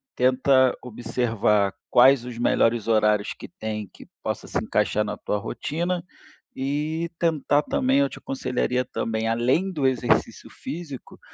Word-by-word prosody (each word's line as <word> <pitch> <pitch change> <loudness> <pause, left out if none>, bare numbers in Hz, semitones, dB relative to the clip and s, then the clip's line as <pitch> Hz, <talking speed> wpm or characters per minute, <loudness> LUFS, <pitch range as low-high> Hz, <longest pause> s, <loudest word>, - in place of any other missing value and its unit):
tenta 130 0 +4
observar 110 -4 0 0.2
quais 130 0 +6
os 125 -2 -7
melhores 115 -1 +2
horários 105 -2 +2
que - - -9
tem 105 -2 -4
que - - -14 0.2
possa - - -3
se - - -3
encaixar 105 - +1
na 105 0 -4
tua 105 - -2
rotina, 170 - -3 0.5
e 150 +5 -2
tentar 150 -3 +2
também, 265 - +1
eu 280 - +2
te - - -10
aconselharia 125 - -1
também 110 -2 -2
além 125 +12 +1
do 150 -6 -2
exercício 130 -2 +1
físico, 155 -6 -8
125 Hz, 140 wpm, -24 LUFS, 115-150 Hz, 0.5 s, quais